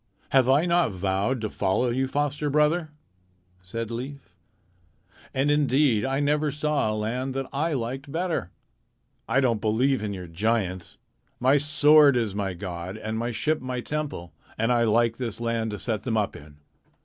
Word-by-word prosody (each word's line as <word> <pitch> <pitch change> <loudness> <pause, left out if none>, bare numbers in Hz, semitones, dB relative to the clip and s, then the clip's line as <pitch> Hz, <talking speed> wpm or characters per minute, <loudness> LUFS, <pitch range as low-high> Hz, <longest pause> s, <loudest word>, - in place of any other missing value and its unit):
"Have 130 -2 +4
I 145 +5 +4
not 175 -3 +3
vowed 100 +5 -1
to 110 - -2
follow 110 +6 +1
you, 130 +2 0
foster 145 +2 -1
brother?" 150 +3 +2 0.7
said 115 +5 -5
Leif. 125 -4 -7 1.0
"And 135 +2 +1
indeed 140 -5 +3
I 135 +1 0
never 150 +1 +1
saw 150 -5 0
a - - -2
land 125 +5 -2
that 135 0 -2
I 155 +4 0
liked 135 +2 -4
better. 165 - -2 0.8
I 125 +4 +3
don't 115 -5 +1
believe 120 +4 +1
in 105 -1 -3
your 95 -2 -6
giants. 95 0 -2 0.4
My 135 +3 +4
sword 145 -1 +5
is 115 -5 -1
my 100 -2 -2
god, 90 +1 -6
and 110 0 -4
my 120 +1 -1
ship 150 +7 0
is - - -14
my 130 -1 -3
temple, 145 - -4 0.2
and 115 +2 +1
I 120 -1 +3
like 115 +1 +2
this 115 -4 -4
land 115 -1 -1
to 105 - -4
set 110 -3 -2
them 115 -3 -1
up 105 -2 -1
in." 75 0 -13
125 Hz, 175 wpm, -26 LUFS, 110-145 Hz, 1.0 s, sword